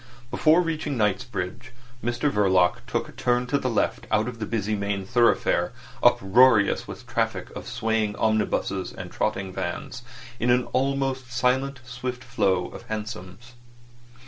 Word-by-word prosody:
Before 160 +3 +4
reaching 155 -4 -2
Knightsbridge, 105 +1 -2 0.3
Mr 120 +5 0
Verloc 95 -4 +3
took - - -1
a - - -11
turn 125 0 0
to 140 +3 0
the 130 - -1
left 115 - -1
out 110 +2 +2
of 120 -2 -6
the 110 - -3
busy 110 -2 -1
main 100 -1 -2
thoroughfare, 120 +3 +2 0.3
uproarious 110 +2 +5
with - - -8
the - - -15
traffic - - -1
of - - -7
swaying 110 -2 0
omnibuses 110 0 0
and - - -8
trotting 95 -1 -2
vans, 90 +9 -4 0.4
in 120 - +1
the 125 0 +4
almost 135 -1 0
silent, 130 +2 0
swift 125 0 -5
flow 95 -7 0
of - - -10
hansoms. 110 +1 -6
120 Hz, 145 wpm, -25 LUFS, 105-125 Hz, 0.4 s, uproarious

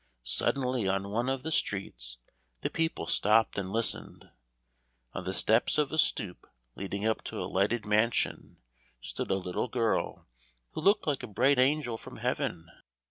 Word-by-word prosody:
Suddenly 125 - 0
on 95 +1 0
one 120 +4 0
of 135 -1 -2
the 160 - -3
streets - - -1 0.4
the - - -2
people 165 - -1
stopped 110 +5 +3
and 95 -1 -3
listened. 115 +1 -2 0.8
On - - -5
the 95 - -1
steps 110 +7 +3
of 150 -2 +2
a 155 - 0
stoop 105 -10 +1 0.3
leading 100 +4 -4
up 110 0 +1
to - - -5
a - - -2
lighted 105 +4 +1
mansion 110 +3 +1 0.4
stood - - -5
a 95 - +3
little 90 +4 -2
girl 115 -2 0 0.5
who - - -5
looked 200 +6 +4
like 145 -3 0
a 125 - -6
bright 125 +6 +3
angel 130 -3 +2
from - - -10
heaven. 80 -1 -2
110 Hz, 160 wpm, -30 LUFS, 95-130 Hz, 0.8 s, looked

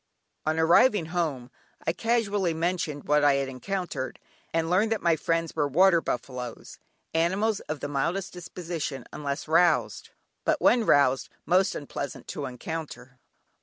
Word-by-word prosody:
On 155 +1 +1
arriving 170 +4 +5
home, 140 -8 -2 0.3
I 165 - +1
casually 205 -6 0
mentioned 165 -3 -1
what 150 0 +2
I 145 -1 +5
had 140 0 0
encountered, 150 +1 -4 0.3
and 165 0 0
learned 195 +6 +2
that 225 - -1
my 170 -2 +4
friends 165 +1 -1
were 145 - +1
"water 170 +4 +5
buffalos," 125 -2 -5 0.3
animals 190 +6 +1
of 155 -1 -3
the - - -2
mildest 170 +7 -2
disposition 170 -5 -5
unless 140 0 -4
roused, 170 +2 +2 0.3
but - - +1
when 235 -3 +4
roused, 135 -2 +4 0.2
most 185 +2 +3
unpleasant 140 -1 -6
to 145 -2 -4
encounter. 125 -2 -7
165 Hz, 140 wpm, -27 LUFS, 140-180 Hz, 0.3 s, arriving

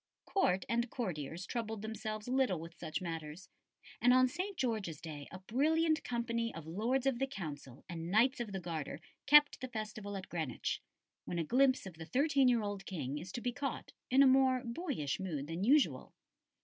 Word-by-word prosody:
Court 190 - +1
and 235 +1 0
courtiers 175 - -4
troubled 220 -2 -3
themselves 215 0 -4
little 255 -9 +2
with 165 +1 -8
such 170 +1 -4
matters, 165 +1 -6 0.5
and 245 +1 +6
on 255 0 +6
St. 370 +8 -4
George's 215 - -1
Day 150 -4 -7
a 185 - -7
brilliant 315 - +2
company 235 -1 -1
of 165 -2 -7
Lords 230 +11 0
of 265 -3 +1
the 270 - +1
Council 145 - -7
and 170 -1 -5
Knights 235 +7 +4
of 235 -4 -3
the 190 - -3
Garter 165 -5 -4 0.3
kept 295 0 +7
the 255 - -3
festival 215 -3 -5
at 190 - -7
Greenwich; 160 -8 -2 0.4
when 175 - -3
a 170 - +1
glimpse 260 - +3
of 190 - -7
the 160 - -7
thirteen 275 - +3
year 240 -3 +3
old 205 -2 -4
King 145 -5 -3
is 180 +4 -8
to 240 - -4
be 245 - 0
caught, 275 0 -4 0.2
in 270 +2 +6
a - - +7
more 260 -1 +5
boyish 235 - -2
mood 160 -7 -3
than 165 +4 -4
usual. 280 +6 +3
215 Hz, 190 wpm, -34 LUFS, 170-255 Hz, 0.5 s, kept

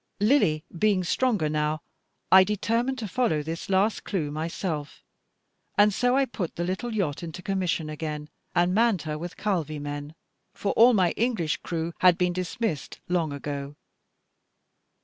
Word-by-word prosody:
Lily 205 - +3
being 195 +1 +2
stronger 210 -3 +1
now, 150 0 0 0.5
I 190 0 +9
determined 230 +6 0
to 225 -4 -4
follow 195 -9 0
this 165 +4 -5
last 195 +3 +2
clue 160 -8 -2
myself; 155 -1 -4 0.7
and 205 0 +5
so 245 +5 +2
I 275 - +4
put 195 -9 -5
the 170 - -2
little 190 +7 -2
yacht 170 -9 -1
into 170 +1 -7
commission 180 -5 -1
again, 150 -1 -5 0.3
and 175 +1 +3
manned 220 -6 +3
her 150 -1 -4
with 175 +2 -7
Calvi 165 -8 -1
men, 145 +1 -6 0.4
for 200 - -1
all 235 +1 +6
my 180 -4 +3
English 220 -10 0
crew 165 0 -4
had 180 -2 +6
been 180 -1 +1
dismissed 180 - -3
long 170 -4 +1
ago. 140 0 -5
175 Hz, 150 wpm, -26 LUFS, 155-210 Hz, 0.7 s, I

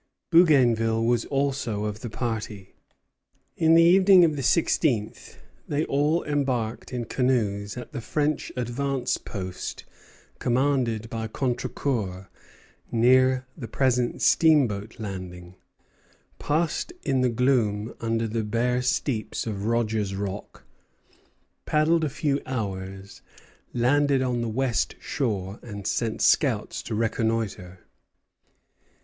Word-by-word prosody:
Bougainville 120 -9 +4
was 120 -1 +1
also 135 -7 -1
of 105 0 -4
the 120 - -6
party. 110 -4 -5 0.8
In 160 0 +4
the 165 - +7
evening 185 +1 +7
of 155 -2 0
the 140 - -3
sixteenth 130 -6 0 0.3
they 150 +2 0
all 150 +4 +1
embarked 130 -7 -2
in 120 -2 -3
canoes 105 -5 -1
at 125 - -8
the - - -5
French 150 +6 -1
advance 125 +2 -1
post 95 -3 -6 0.5
commanded 125 -3 0
by 110 -1 -3
Contrecœur, 115 -6 -3 0.6
near 130 +2 +4
the 120 -7 -7
present 125 0 0
steamboat 120 -10 +3
landing, 90 -4 -7 0.9
passed 160 - -1
in 130 -1 +1
the 125 - +3
gloom 115 -3 +1
under 115 0 0
the 110 0 -2
bare 120 +3 0
steeps 125 -2 -1
of 105 -3 -4
Rogers 110 -3 0
Rock, 100 +1 -6 1.0
paddled 160 +2 +2
a 155 - 0
few 140 +1 -1
hours, 95 -5 -5 0.5
landed 135 +2 +2
on 125 -2 -1
the 115 - -2
west 125 +1 0
shore, 100 -7 -3
and 100 -4 -8
sent 115 -2 -1
scouts - - +2
to 110 - -5
reconnoitre. 110 -5 -2
120 Hz, 115 wpm, -25 LUFS, 105-135 Hz, 1.0 s, the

